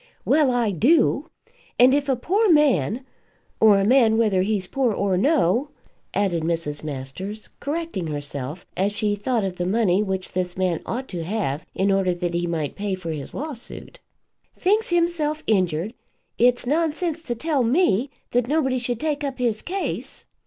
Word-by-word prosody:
"Well, 300 -3 +4
I 240 -4 +1
do. 280 - +3 0.5
And 250 +2 +6
if 285 0 +1
a 265 - +3
poor 390 - +2
man, 260 - +3 0.5
or 215 -2 +6
a 195 - +2
man 225 -2 +5
whether 210 -5 +3
he's 200 -1 0
poor 255 +4 0
or 200 -2 0
no," 260 - +2 0.5
added 190 -5 +1
Mrs. 160 -3 -2
Masters, 155 +9 -6
correcting 295 - -3
herself, 145 +1 -5
as 200 +2 0
she 210 0 0
thought 220 +2 -1
of 190 -2 -3
the 175 - -1
money 200 -2 +2
which 190 -2 -3
this 180 -1 -2
man 185 -3 0
ought 255 +3 -3
to 175 -3 -4
have 170 -6 -2
in 195 +1 +2
order 190 -2 +2
that 175 -1 -3
he 175 0 -1
might 160 -4 -2
pay 200 -1 -2
for 175 -3 -5
his 145 -3 -6
lawsuit, 295 - -7 0.6
"thinks 420 +4 +1
hisself 335 -3 0
injured, 185 -1 +1 0.5
it's 245 +1 +3
nonsense 320 +3 0
to 245 -7 -4
tell 295 +2 0
me 250 - +2 0.2
that 245 -1 +1
nobody 265 -3 +1
should 245 -1 -2
take 300 -2 -1
up 275 -2 -3
his 235 -4 0
case. 385 +2 -4
220 Hz, 165 wpm, -23 LUFS, 185-280 Hz, 0.6 s, And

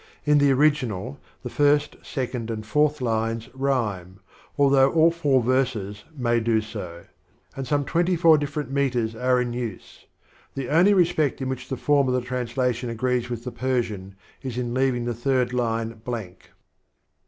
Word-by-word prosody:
In 150 -1 +4
the 145 0 +4
original, 130 -4 +1 0.2
the - - -4
first, 145 0 +2
second 125 -4 -4
and 110 -1 -4
fourth 150 +4 +1
lines 115 0 -1
rhj'^rae, 115 -10 -2 0.4
though 140 -1 +4
all 165 0 +4
four 145 -7 +1
verses 115 -5 -1
may 120 -2 +1
do 115 -1 +2
so; 95 -6 -7 0.5
and 135 -2 -5
some 145 +2 0
twenty 175 +4 +1
four 165 -1 +6
different 145 -2 -4
meters 125 -5 0
are 125 +2 +2
in 120 -1 -2
use. 120 -5 -7 0.5
The 135 -2 -4
only 180 +7 +5
respect 165 -6 +2
in 130 -1 -3
which 130 -1 -5
the 130 - -3
fonn 140 +1 +2
of 125 - +1
the 125 - +1
translation 125 0 -2
agrees 120 +1 -1
with 120 -1 -5
the 125 - -5
Persian 110 -8 -2 0.3
is 125 -3 -5
in 120 -1 -2
leaving 130 -2 +1
the 120 - -1
third 125 +1 0
line 115 -2 -2
blank. 110 -7 -6
125 Hz, 165 wpm, -24 LUFS, 115-140 Hz, 0.5 s, four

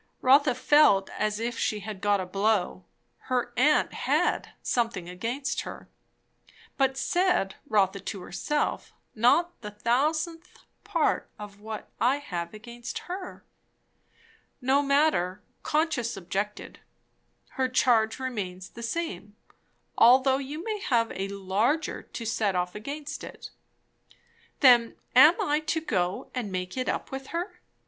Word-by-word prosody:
Rotha 270 0 +5
felt 255 -7 +4
as 210 0 -1
if 235 +1 -3
she 210 -1 -1
had 205 -1 -7
got 205 -1 +2
a 185 - -3
blow. 195 -1 0 0.4
Her 245 -1 0
aunt 295 +4 +3
had - - 0
"something 230 -8 -1
against 235 +10 -3
her." - - -9 0.9
But, 270 -1 +1
said 350 - +1
Rotha 200 -5 +2
to 195 0 -6
herself, 295 +11 -2 0.2
not 330 +10 +2
the 210 - -6
thousandth 310 - -1 0.2
part - - 0
of 205 -1 -10
what 215 0 -7
I 250 +3 +3
have 175 -12 -5
against 235 +3 -8
her. 370 0 -7 1.1
No 270 +2 +3
matter, 280 - +1 0.2
conscience 295 -8 0
objected; 195 +3 -4 0.7
her 260 -1 -1
charge 230 -3 +3
remains 195 -8 -5
the 235 - -10
same, 230 - -4 0.6
although 260 +3 +6
you 290 +4 -6
may 430 0 -3
have 235 - +1
a 195 +1 -3
larger 200 +10 -1
to 230 - -8
set 215 -3 0
off 180 0 -1
against 285 +6 -6
it. - - -9 1.1
Then 240 -4 +6 0.2
am 300 +7 +8
I 295 +1 +1
to 315 +1 -1
go 185 - -2
and 235 -6 -3
make 180 0 -4
it 255 -1 -2
up - - -3
with 270 0 -6
her? 345 +4 -5
235 Hz, 130 wpm, -27 LUFS, 200-280 Hz, 1.1 s, am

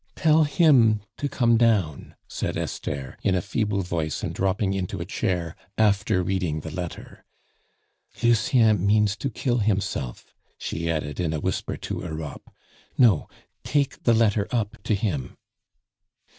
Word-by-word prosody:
"Tell 155 0 +4
him 135 -9 +4 0.2
to 145 - -2
come 120 -4 +3
down," 105 - +1
said - - -3
Esther, 70 -2 -4
in 95 - +2
a - - +2
feeble 105 -1 -1
voice 80 -3 -3
and - - -2
dropping 95 +1 0
into 95 -2 -3
a - - -4
chair 85 -3 -2 0.2
after 100 -3 +2
reading 90 -4 -1
the 80 - -7
letter. 90 +1 -7 1.0
"Lucien 115 -3 +4
means 105 0 +3
to 135 - -2
kill 120 +1 -1
himself," 100 - -2 0.2
she 85 +1 -3
added 75 -3 -2
in 85 -3 0
a 80 - -1
whisper - - -2
to - - -5
Europe. 80 -3 -7 0.5
"No, 110 - +4 0.3
take 140 -2 0
the 120 - +3
letter 105 -2 +2
up 110 -4 -2
to 110 - +2
him." 90 - -3
100 Hz, 145 wpm, -25 LUFS, 85-115 Hz, 1.0 s, Tell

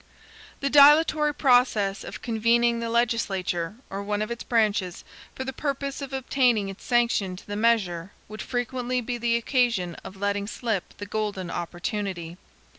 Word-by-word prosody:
The 275 - 0
dilatory 300 +1 +6
process 245 -8 +2
of - - -9
convening 235 +1 +2
the 230 0 -3
legislature, 200 -7 0
or 195 +1 -5
one 205 +1 -1
of 215 - -6
its 235 - -5
branches, 210 -6 0 0.3
for 260 - -4
the 265 0 -5
purpose 280 0 -3
of 275 -1 -6
obtaining 250 -6 +1
its 195 - -10
sanction 235 -6 +1
to 180 - -13
the 205 - -5
measure, 205 -6 +1 0.2
would 215 +1 -8
frequently 250 0 -2
be 245 0 -4
the 235 0 +1
occasion 235 -7 +1
of 190 - -9
letting 200 0 -1
slip 215 -3 -3
the 205 - -6
golden 205 -4 -3
opportunity. 175 -1 -4
225 Hz, 155 wpm, -26 LUFS, 200-245 Hz, 0.3 s, dilatory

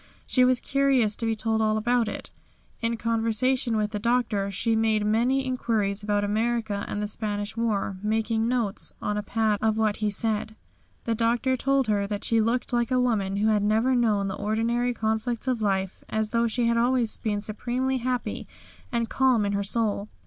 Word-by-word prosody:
She 255 - +3
was 250 0 +3
curious 270 -6 +2
to 230 - -2
be 225 - +1
told 220 0 0
all 215 0 +2
about 240 +1 +1
it. - - -6 0.5
In 230 0 -1
conversation 230 +1 +1
with 210 -1 -1
the 210 - -3
Doctor 220 -3 0
she 225 +4 0
made 220 -1 +1
many 245 +5 +2
inquiries 220 -6 -1
about 205 0 0
America 220 0 -1
and 210 - -3
the - - -1
Spanish 205 -1 -2
war, 210 -4 -1
making 220 +1 0
notes 235 -5 -1
on 210 - -2
a 210 - -1
pad 215 0 0
of 220 0 +1
what 215 -2 +1
he 215 -1 0
said. 215 +1 -2 0.5
The 230 - 0
Doctor 235 +3 +1
told 275 +1 +1
her 205 -2 0
that 205 0 -4
she 230 -1 +2
looked 235 +3 -1
like 240 0 +1
a 255 -1 +2
woman 210 -6 0
who 210 +2 +2
had 210 -1 +2
never 220 +5 +2
known 215 -5 +2
the 195 - -3
ordinary 230 +4 -1
conflicts 220 +3 -2
of 250 -3 0
life, 195 -2 -1
as 220 0 -1
though 235 +1 +1
she 235 +1 0
had 235 0 +2
always 240 -1 +2
been 210 -2 -2
supremely 250 +5 -1
happy 250 0 -3 0.4
and 235 -2 0
calm 255 -4 +2
in 200 - 0
her 200 0 -1
soul. 210 0 0
225 Hz, 190 wpm, -26 LUFS, 210-240 Hz, 0.5 s, She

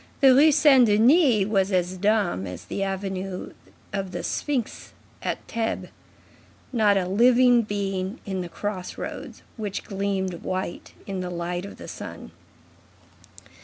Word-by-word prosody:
The 270 -2 +7
Rue 295 +4 +6
Saint 270 -4 +6
Denis 230 - +5
was 195 -1 +1
as 180 0 0
dumb 200 - +1
as 90 -1 -8
the 195 - -4
avenue 195 -1 -4 0.4
of 195 -2 -3
Sphinxes 265 -7 -3 0.3
at - - -2
Thebes. 225 -1 -2 0.8
Not 210 -4 +4
a 185 -2 0
living 245 +4 +5
being 200 -1 -3
in 190 -3 -3
the 175 - -6
crossroads, 185 +1 -6
which 205 -3 -4
gleamed 195 -3 -2
white 185 -2 -4
in 195 -2 -4
the 180 -1 -3
light 175 +1 -3
of - - -11
the - - -10
sun. - - -8
195 Hz, 130 wpm, -25 LUFS, 185-225 Hz, 0.8 s, The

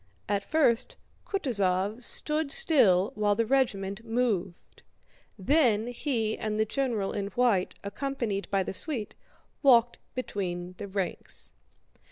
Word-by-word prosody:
At 200 -1 0
first 250 -3 +2 0.3
Kutúzov 205 - 0
stood 300 +3 0
still 205 - +4
while 205 -1 +1
the 230 +2 +1
regiment 215 -5 0
moved; 225 -7 -2 0.6
then 235 -1 +2
he 235 -4 -1
and 215 -1 -2
the 220 - +2
general 230 -5 -1
in 200 -1 -3
white, 205 -3 +1
accompanied 220 -2 -3
by 195 -1 +1
the - - -5
suite, 225 - -2 0.5
walked 245 -4 +5 0.2
between 180 -7 -4
the 205 - -5
ranks. 190 - -4
220 Hz, 120 wpm, -28 LUFS, 195-255 Hz, 0.6 s, walked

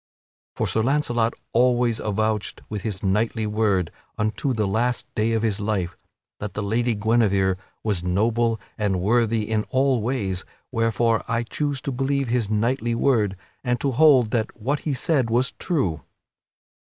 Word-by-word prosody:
For - - 0
Sir 110 - +1
Launcelot 120 -3 +1 0.2
always 120 -1 +3
avouched 110 0 -1
with 105 -2 -4
his 100 -2 -4
knightly 110 +3 +1
word, 105 -5 +1 0.3
unto 110 +5 0
the 110 -4 0
last 120 +5 0
day 110 +1 +1
of 110 0 0
his 110 -2 0
life, 100 -4 -1 0.4
that 100 -2 -5
the 105 - -2
Lady 115 +3 +1
Guinevere 100 -3 +2 0.3
was 100 -6 -1
noble 110 +5 +1 0.2
and 100 -3 +1
worthy 110 +2 +2
in 110 -1 0
all 130 -2 +2
ways, 105 -6 -1 0.3
wherefore 115 -1 +1
I 115 +1 0
choose 140 +2 -2
to 140 - -3
believe 135 0 0
his 120 -3 +1
knightly 115 +2 0
word 110 -6 +2 0.3
and 125 -2 0
to 140 - 0
hold 130 -4 +5
that 115 -1 -1
what 140 +7 0
he 140 - 0
said 130 -2 +1
was 125 +3 +2
true. 130 - 0
115 Hz, 155 wpm, -24 LUFS, 105-125 Hz, 0.4 s, hold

